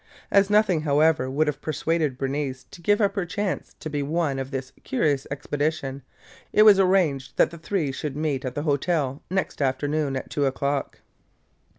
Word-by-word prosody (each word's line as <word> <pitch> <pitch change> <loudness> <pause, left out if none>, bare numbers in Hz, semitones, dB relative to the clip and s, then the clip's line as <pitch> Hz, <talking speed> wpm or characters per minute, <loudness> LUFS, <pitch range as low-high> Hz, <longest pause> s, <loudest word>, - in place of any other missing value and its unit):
As 200 0 +4
nothing, 205 -6 +3
however, 150 -2 +2
would 145 +4 +1
have 150 -2 -3
persuaded 155 -3 -1
Bernice 135 -1 -3
to 175 - -12
give 205 +4 +3
up 200 -2 +2
her 200 - -1
chance 190 +2 -3
to - - -6
be 145 -1 -2
one 145 -1 -1
of 135 0 -4
this 130 -2 -5
curious 135 +1 0
expedition, 145 -1 -2 0.5
it 215 - +6
was 210 -2 +8
arranged 180 -8 +2
that - - +4
the 170 - -9
three 165 -4 -1
should 135 +1 -5
meet 150 -3 -1
at 130 -2 -4
the 145 - -2
hotel 145 -2 0
next 190 -4 -2
afternoon 140 +1 0
at 130 - -5
two 145 -2 +1
o'clock. 140 +1 -2
150 Hz, 180 wpm, -25 LUFS, 135-170 Hz, 0.5 s, was